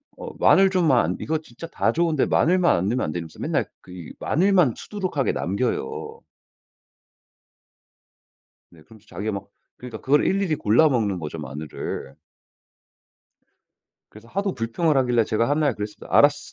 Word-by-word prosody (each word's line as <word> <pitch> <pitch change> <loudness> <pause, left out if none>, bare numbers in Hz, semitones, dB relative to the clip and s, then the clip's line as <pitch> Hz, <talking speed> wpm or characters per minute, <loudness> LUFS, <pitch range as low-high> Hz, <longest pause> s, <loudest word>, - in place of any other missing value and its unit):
어 - - -8
마늘 195 0 +5
좀만 140 - +2
이거 160 +1 -1
진짜 155 +2 -11
다 - - 0
좋은데 165 -4 +1
마늘만 180 +1 +3
안 95 +3 -1
넣으면 125 +4 0
안되냐면서 80 0 -6
맨날 - - 0 0.2
그 - - -16
이 90 -3 -9
마늘만 180 - +2
수두룩하게 185 -10 -2
남겨요. 100 - -3 2.5
네. 80 -2 -18
그러면서 110 +6 -19
자기가 110 +2 -4
막 100 0 -6 0.3
그러니까 120 -3 -9
그걸 145 +2 +2
일일이 195 -4 +1
골라 120 +10 +4
먹는 110 -9 0
거죠 80 0 -6
마늘을. 75 -1 -6 1.9
그래서 110 +2 -15
하도 195 +6 -2
불평을 130 +6 0
하길래 120 -3 +2
제가 115 +2 0
한날 145 -3 +1
그랬습니다. 105 0 -7
"알았어. 145 0 +4
125 Hz, 325 characters per minute, -23 LUFS, 100-160 Hz, 2.5 s, 마늘